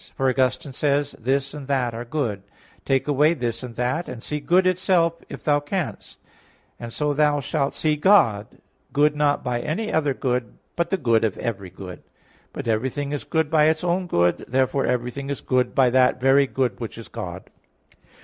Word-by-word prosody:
For 135 - 0
Augustine 130 +2 0
says 145 +1 0
(De - - -14
Trin. - - -22
viii), 130 +3 +3
"This 140 0 -3
and 145 -3 -8
that 130 -4 0
are 115 +1 -6
good; 120 -7 -2 0.4
take 135 0 +1
away 150 +3 +3
this 120 -4 -3
and 125 -2 -8
that, 125 +9 -1
and 115 - -8
see 150 - -3
good 175 +6 +3
itself 180 -2 +2
if - - -9
thou 145 -1 +3
canst; 165 +3 -4 0.6
and 120 -1 -7
so 150 +4 -1
thou 150 0 +2
shalt 140 0 -1
see 155 -1 +1
God, 130 - +4 0.5
good 150 +1 +3
not 145 -1 +1
by 125 -1 -1
any 215 - -3
other 145 -4 +1
good, 125 -4 -2 0.2
but 170 - 0
the 195 - +1
good 115 -8 +2
of 110 -3 0
every 100 -5 -4
good." 90 -1 -10 0.5
But - - -6
everything 130 +6 -1
is 145 - -3
good 160 -1 -1
by 155 -2 +5
its 160 +1 +2
own 180 +1 0
good; 85 - +1
therefore 130 +2 +1
everything 125 +3 -2
is 140 - -3
good 130 -1 0
by 130 -2 +4
that 125 0 +3
very 135 +2 +4
good 125 -6 -1
which 115 -2 -6
is 115 - -9
God. 90 0 -7
135 Hz, 195 wpm, -23 LUFS, 120-150 Hz, 0.6 s, by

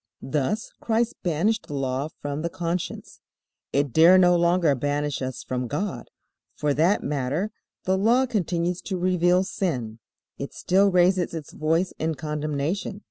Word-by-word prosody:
Thus 150 - -1
Christ 235 +1 0
banished 185 +6 0
the 145 - -5
Law 135 +1 -1 0.2
from 145 +1 -3
the 170 - -2
conscience. 170 +1 -4 0.5
It 140 -3 0
dare 170 +5 +7
no 180 -1 +5
longer 170 -2 +3
banish 145 +2 -1
us 130 -1 -4
from 125 -1 -3
God. 150 - -4 0.5
For 150 -1 0
that 165 +8 +2
matter, 145 +8 -1 0.3
the 190 0 +1
Law 240 +6 +4
continues 180 -6 -1
to 190 - -1
reveal 180 0 +3
sin. 130 - -3 0.4
It - - -6
still 195 +2 +3
raises 180 -1 +2
its 155 -3 -7
voice 165 +4 0
in 160 0 -1
condemnation. 150 +6 -3
170 Hz, 145 wpm, -25 LUFS, 145-185 Hz, 0.5 s, dare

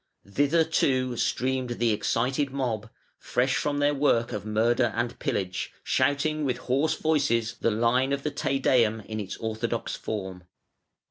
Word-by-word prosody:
Thither, 145 +10 +2
too, 130 -5 +1
streamed 130 0 -1
the 115 -1 +2
excited 125 +6 0
mob, 120 -5 -3 0.3
fresh 130 +2 0
from 145 -1 0
their 145 0 +2
work 135 -5 +2
of 105 0 -5
murder 115 +2 +2
and 120 0 -2
pillage, 95 -1 -2
shouting 145 +3 +1
with 130 -3 0
hoarse 135 +6 0
voices 140 -8 +1
the - - +2
line 120 +4 +2
of 140 0 -1
the 150 - -1
Te 140 -1 -1
Deum 115 -5 +2
in 110 +1 -6
its 100 -3 -5
orthodox 115 +1 -3
form. 95 -4 -5
125 Hz, 150 wpm, -27 LUFS, 110-140 Hz, 0.3 s, Thither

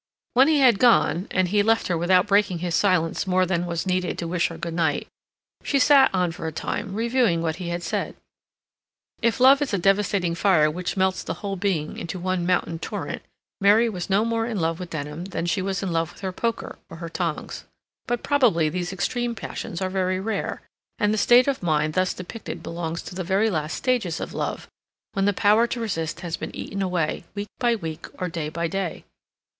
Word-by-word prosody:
When 260 +3 +6
he 305 -3 +3
had 240 -6 +5
gone, 230 -6 +4
and 185 -1 +1
he 205 +2 +3
left 225 +2 +2
her 180 - 0
without 180 +2 +3
breaking 205 -3 +2
his 175 0 -3
silence 185 0 +1
more 185 0 +3
than 175 -1 -1
was 170 0 -2
needed 185 -1 -1
to 170 - -3
wish 170 0 +1
her 165 - -8
good 170 0 -5
night, 160 -3 0 0.5
she 280 - 0
sat 275 0 +6
on 180 -2 +1
for 165 -1 -6
a - - -2
time, 195 +5 -4
reviewing 230 -7 +1
what 160 -1 -1
he 180 -2 -5
had 175 0 -3
said. 165 - -2 1.1
If 230 +1 +1
love 270 +3 +7
is 275 -8 0
a - - +1
devastating 195 -1 +2
fire 170 -4 +3
which 180 +4 -4
melts 190 0 +1
the - - -4
whole 200 -1 -4
being 180 -6 -2
into 170 +2 -5
one 180 -1 -1
mountain 170 -2 0
torrent, - - -5 0.4
Mary 210 +4 +5
was 185 -4 -5
no 200 +3 +3
more 230 0 0
in 225 -4 -2
love 165 0 -1
with 180 -1 -6
Denham 150 +2 -5
than 185 -3 -3
she 175 +2 0
was 195 +1 -2
in 190 - -2
love 165 -1 0
with - - -17
her 190 -1 -2
poker 230 +5 -3
or 165 - -9
her 170 0 -6
tongs. 165 -1 -4 0.4
But 240 -1 -1
probably 235 - +3
these 175 +2 -3
extreme 240 +5 -2
passions 175 -4 -5
are 185 - -1
very 185 -1 0
rare, 220 +3 -3 0.3
and 210 0 +2
the - - 0
state 245 +4 +6
of 275 -1 0
mind 155 -3 +1
thus 185 +1 +1
depicted 185 +5 -7
belongs 165 0 -4
to - - -8
the 185 +1 -3
very 200 +5 +2
last 155 -3 -2
stages 240 -11 0
of - - -5
love, - - -3 0.5
when 195 0 +1
the 205 - +4
power 210 +4 +4
to 235 - -4
resist 170 -7 -3
has 170 -3 -3
been - - -6
eaten 200 - -5
away, 180 -5 -1
week 205 0 -4
by 240 -2 +3
week 160 -7 -6
or 180 -1 -2
day 160 -2 -3
by 170 +2 -2
day. 190 -1 -3
185 Hz, 215 wpm, -24 LUFS, 170-210 Hz, 1.1 s, love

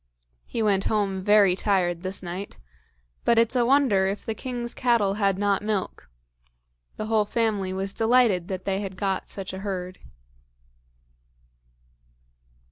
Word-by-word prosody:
He 230 - -2
went 195 -2 +2
home 200 -3 0
very 205 -2 +5
tired 180 -4 0
this 190 +1 -4
night, 180 +3 -6 0.7
but 235 - +3
it's 230 +2 +3
a 245 - +3
wonder 250 -9 +3
if 195 +1 -4
the 225 - -2
king's 240 0 -5
cattle 235 -6 +2
had 200 -2 +1
not 200 -1 +1
milk. 205 - -3 0.9
The 215 - -4
whole 215 -1 +2
family 210 -4 -1
was 195 +1 -3
delighted 225 -6 +3
that 185 -2 -5
they 195 0 -1
had 190 -2 -6
got 195 0 -2
such 190 -2 -6
a 190 - -5
herd. 185 -2 -5
200 Hz, 140 wpm, -25 LUFS, 190-220 Hz, 0.9 s, very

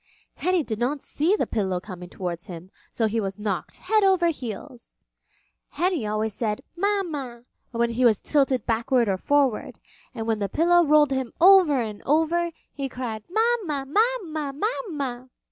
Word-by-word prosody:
Henny 365 -2 +1
did 220 -5 -4
not 270 +4 -1
see 330 +8 +1
the - - 0
pillow 190 -5 -1
coming 180 -2 -9
towards 175 -1 -5
him 180 0 -9 0.2
so 225 - -1
he 220 +1 0
was 195 -1 -4
knocked 210 -3 -3
head 430 +3 +1
over 375 -3 +4
heels. 250 -2 -8 0.6
Henny 345 - -1
always 215 +1 -1
said 210 -1 -2
"Mama" 335 -11 -2 0.3
when 235 -1 0
he 240 +2 0
was 225 -5 +5
tilted 270 -5 +1
backward 235 +1 +1
or 195 -1 +1
forward, 275 +1 +1 0.4
and 225 -2 -4
when 225 -1 0
the 200 -1 -2
pillow 345 - +4
rolled 300 -2 +4
him 265 -3 -2
over 355 -6 +7
and 215 -2 -7
over, 325 +4 +2 0.2
he 275 -2 -4
cried, 235 -4 -5
"Mama, 415 - 0
Mama, 335 - 0
Mama!" 290 - -3
265 Hz, 160 wpm, -25 LUFS, 220-340 Hz, 0.6 s, over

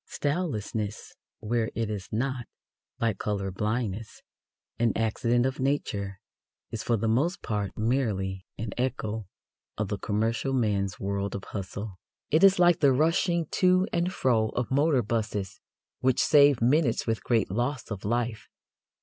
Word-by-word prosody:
Stylelessness, 110 - -2 0.3
where 115 +1 0
it 115 -1 -1
is 100 -3 -5
not, 125 +2 -2 0.5
like 115 -4 0
colour 100 -2 -2
blindness, 105 +1 -3 0.6
an 115 -1 +3
accident 115 +2 +1
of 130 +2 -2
nature, 105 -8 -1 0.5
is 115 - -3
for 115 - +1
the 110 - -1
most 145 - +1
part 105 -3 -2
merely 105 -6 0
an 110 -1 -4
echo 110 -5 -2 0.5
of 105 -2 -2
the 100 - -2
commercial 115 +5 0
man's 100 -6 0
world 100 0 -2
of 100 - -5
hustle. 100 0 -6 0.3
It 160 +4 +4
is 195 0 +7
like 175 -1 +5
the 140 -3 +5
rushing 165 +4 +2 0.2
to 185 +1 +5
and 175 +1 +1
fro 115 -9 +2
of 125 0 -2
motor 140 -2 +3
buses 105 -3 -3 0.4
which 130 -1 +2
save 145 -5 +5
minutes 135 0 +3
with 115 -1 -1
great 115 -6 +1
loss 120 +3 -2
of 100 -2 -5
life. 120 +1 -1
115 Hz, 145 wpm, -28 LUFS, 105-135 Hz, 0.6 s, is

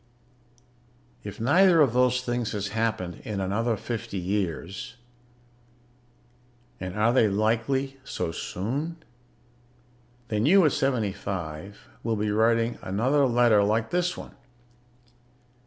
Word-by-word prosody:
If 105 - -8
neither 170 +9 +5
of 135 -6 +4
those 125 0 +3
things 120 -2 -2
has 105 -1 -3
happened 110 -6 -2
in 105 -2 -4
another 105 +4 0
fifty 110 -3 -5
years 95 - -3 1.8
(and 90 0 -5
are 115 +3 +3
they 120 -4 +4
likely 120 +7 0
so 80 - -3
soon?), 135 - -4 1.3
then 105 +3 +1
you, 190 +1 +6
at 150 - +4
seventy 120 -9 0
five, 95 -1 -6
will 115 -1 -1
be 105 0 -1
writing 115 +2 +2
another 130 +9 +2
letter 120 -4 +4
like 110 +2 0
this 180 0 0
one. - - -9
115 Hz, 115 wpm, -26 LUFS, 100-125 Hz, 1.8 s, you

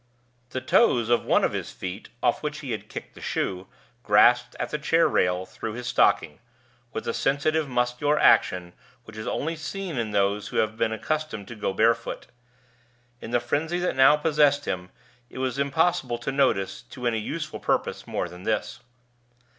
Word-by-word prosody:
The 130 - -4
toes 125 - +3
of 120 - +2
one - - +3
of - - +1
his - - -4
feet, 95 +3 -7
off - - +2
which 150 0 -4
he 135 -4 -5
had 105 -1 -5
kicked - - -8
the - - -14
shoe, 95 0 -2 0.3
grasped 120 +3 +4
at - - -3
the 150 - -2
chair 165 +3 +3
rail 90 +1 +1
through 110 - -6
his 125 +1 -6
stocking, 120 - +2 0.5
with - - -4
the - - -2
sensitive 150 +2 +1
muscular 125 +4 +1
action 90 -9 +3 0.3
which 110 -2 -13
is 110 - -6
only 165 +3 -2
seen 165 -1 -5
in 115 -2 -2
those 100 0 0
who - - -5
have 110 0 +1
been 110 0 0
accustomed 150 -3 -3
to 120 - -7
go 105 - -2
barefoot. 115 +4 +1 1.0
In - - -7
the 120 +1 +2
frenzy 150 +8 -1
that 180 0 -1
now 135 +3 +6
possessed 150 -2 +3
him, 90 0 -3 0.4
it - - -12
was 130 0 -2
impossible 140 -3 +1
to 120 +3 -4
notice, 95 -9 +1
to 125 - -9
any 115 -2 +1
useful 155 +7 -5
purpose, - - -1
more - - -2
than 90 0 -11
this. 105 +2 -2
120 Hz, 180 wpm, -25 LUFS, 105-150 Hz, 1.0 s, now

